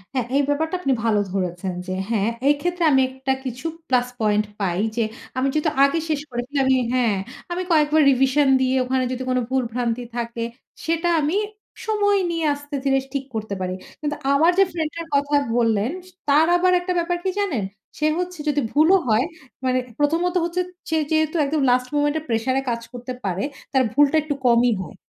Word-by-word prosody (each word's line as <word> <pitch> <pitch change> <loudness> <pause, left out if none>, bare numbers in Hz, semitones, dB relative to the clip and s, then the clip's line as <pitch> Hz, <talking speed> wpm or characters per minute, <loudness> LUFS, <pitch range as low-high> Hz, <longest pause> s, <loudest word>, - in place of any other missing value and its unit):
হ্যাঁ, 255 -3 0
এই 285 - +4
ব্যাপারটা 320 +4 0
আপনি 275 -6 +2
ভালো 220 -2 +2
ধরেছেন 185 -1 -2
যে 185 - -2 0.2
হ্যাঁ, 220 -2 +1 0.2
এই 290 - +6
ক্ষেত্রে 350 +1 -1
আমি 265 -1 +5
একটা 265 +1 -2
কিছু 255 +3 -6 0.2
প্লাস 250 -1 +2
পয়েন্ট 210 -1 +2 0.2
পাই, 180 -2 0 0.2
যে 235 - +1 0.3
আমি 260 +1 +2
যেহেতু 305 0 +1
আগে 280 +4 +3
শেষ 300 -2 0
করেছি 245 +3 -5
আমি 265 0 +4 0.2
হ্যাঁ, 235 -5 +2 0.4
আমি 365 +1 -1
কয়েকবার 310 -1 +4
রিভিশন 270 +2 +3
দিয়ে 260 0 +2
ওখানে 260 0 0
যদি 255 +1 -4
কোনো 255 0 +1
ভুল 260 0 +1
ভ্রান্তি 245 0 -1
থাকে, 235 0 -3 0.4
সেটা 330 +1 +1
আমি 300 +5 0 0.5
সময় 410 -2 +2
নিয়ে 330 -1 -1
আস্তে 290 0 -7
ধীরে 270 -1 +3
ঠিক 275 -1 -2
করতে 215 -2 -3
পারি। 185 0 -2 0.3
কিন্তু 295 -1 -2 0.2
আমার 320 +5 +5
যে - - +8
ফ্রেন্ড 320 -2 -2
টার 335 -1 -5
কথা 285 +1 +2 0.2
বললেন, 230 +1 +2 0.2
স - - -15 0.2
তার 300 +3 +5
আবার 365 +1 +3
একটা 360 +1 -2
ব্যাপার 350 +1 -1
কি 380 - 0
জানেন? 330 - 0 0.3
সে 305 - 0
হচ্ছে 360 -1 -4
যদি 290 0 +1
ভুলও 320 +6 +5
হয় 225 +2 +3 0.4
মানে 255 0 +2 0.2
প্রথমত 330 +5 +1
হচ্ছে 345 +2 -1 0.3
সে 320 - +1 0.2
যেহেতু 315 0 +1
একদম 295 +1 0
লাস্ট 250 0 +2
মোমেন্ট 290 0 +2
এ - - -11
প্রেশার 230 +3 0
এ - - -2
কাজ 235 -1 -2
করতে 245 +1 -6
পারে 190 +1 -1 0.3
তার 265 -1 +4
ভুলটা 290 +3 +4
একটু 300 -2 -2
কমই 240 0 +5
হয়। 185 - -9
275 Hz, 195 wpm, -22 LUFS, 240-315 Hz, 0.5 s, যে